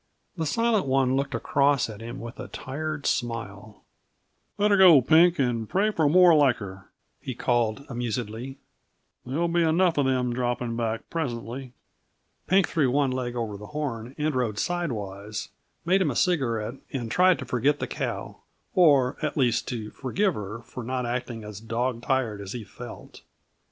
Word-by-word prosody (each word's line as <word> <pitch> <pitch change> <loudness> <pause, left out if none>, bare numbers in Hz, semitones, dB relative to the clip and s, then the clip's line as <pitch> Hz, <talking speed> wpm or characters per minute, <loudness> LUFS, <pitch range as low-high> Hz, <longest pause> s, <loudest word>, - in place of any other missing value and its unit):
The 160 -3 -2
Silent 230 -1 +1
One 130 -1 +2
looked 140 -2 -1
across 140 +2 +2
at 110 -1 -9
him 120 +4 -7
with 120 +1 -8
a - - -6
tired 150 +2 -5
smile. 110 -4 -3 0.7
"Let 205 +1 +3
her 200 - +5
go, 180 -6 +9
Pink, 165 +7 +5
and 120 -5 0
pray 205 +3 +2
for 160 -7 +2
more 180 +1 +7
like 145 -5 +5
her," 95 -2 -9 0.3
he 130 - -6
called 120 +1 0
amusedly. 120 +1 -4 0.7
"There'll 160 +7 0
be 170 +1 +1
enough 165 0 +3
of 140 - +2
them 125 -2 +1
dropping 120 -1 -2
back 115 -1 -2
presently." 125 -4 -4 0.7
Pink 190 0 +4
threw 145 -6 +1
one 140 +1 +2
leg 125 -1 -3
over 110 -4 -3
the 105 +1 -10
horn 130 -4 -4
and 150 0 0
rode 120 -5 -1
sidewise, 105 - -3 0.4
made 190 +3 +3
him - - +2
a - - -3
cigarette, 125 -9 0
and 120 -4 -4
tried 185 0 +5
to 135 - -6
forget 130 +4 +1
the - - -3
cow - - -4 0.4
or, 145 - +4
at 155 0 -2
least, 120 -3 +2
to 110 -4 -4
forgive 185 +9 0
her 105 0 -6
for 125 +2 -8
not 125 +1 -2
acting 120 -2 -4
as 105 -1 -8
dog 115 +2 -2
tired 120 -6 -1
as 100 -1 -6
he 120 -3 -5
felt. 120 +2 -11
125 Hz, 170 wpm, -26 LUFS, 115-150 Hz, 0.7 s, go